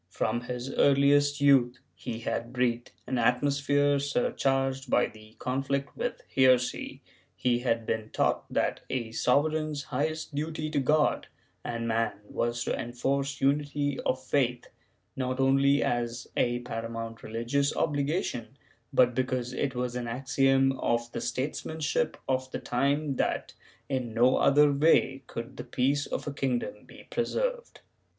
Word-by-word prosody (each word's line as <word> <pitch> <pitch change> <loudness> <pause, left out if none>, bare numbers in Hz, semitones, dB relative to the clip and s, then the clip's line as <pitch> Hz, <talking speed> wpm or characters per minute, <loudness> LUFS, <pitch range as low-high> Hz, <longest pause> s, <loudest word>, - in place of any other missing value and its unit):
From 120 +2 -1
his 125 +2 -5
earliest 145 +1 +4
youth 130 -3 +4 0.2
he 115 -1 -6
had 115 +1 -3
breathed 125 -1 0
an 130 -1 -1
atmosphere 140 +3 +2
surcharged 135 - 0
by 125 - +4
the 110 0 -13
conflict 140 +2 -2
with - - -3
heresy; 130 -2 +2 0.3
he 120 -1 +1
had 115 -2 0
been 110 -1 -2
taught - - 0
that - - 0
a 120 -4 -2
sovereign's 150 +4 +1
highest 155 +4 -3
duty 155 +1 -3
to 150 - +1
God 150 +3 +2 0.4
and 115 -1 -3
man 115 0 +1
was 120 +3 -2
to - - -1
enforce 135 +3 -2
unity 145 0 +1
of 130 0 -1
faith, 125 -3 0 0.5
not 130 0 -2
only 135 +1 +4
as 120 0 -1
a 120 0 +1
paramount 115 -1 -5
religious 120 +6 -1
obligation, 140 -4 -1 0.3
but 125 -3 +4
because 125 -1 -1
it 135 0 -2
was 125 0 -2
an 125 -1 -3
axiom 135 +2 +2
of 120 0 0
the - - -4
statesmanship 155 +3 -2
of 130 0 0
the - - -4
time 140 +2 0
that, - - -1 0.3
in 125 -4 -3
no 125 +3 +4
other 145 +1 +5
way, 140 -2 +3
could 115 0 -7
the - - -5
peace 140 +3 0
of - - -4
a 145 - -4
kingdom 135 - -2
be - - -14
preserved. - - -2
130 Hz, 140 wpm, -28 LUFS, 120-145 Hz, 0.5 s, other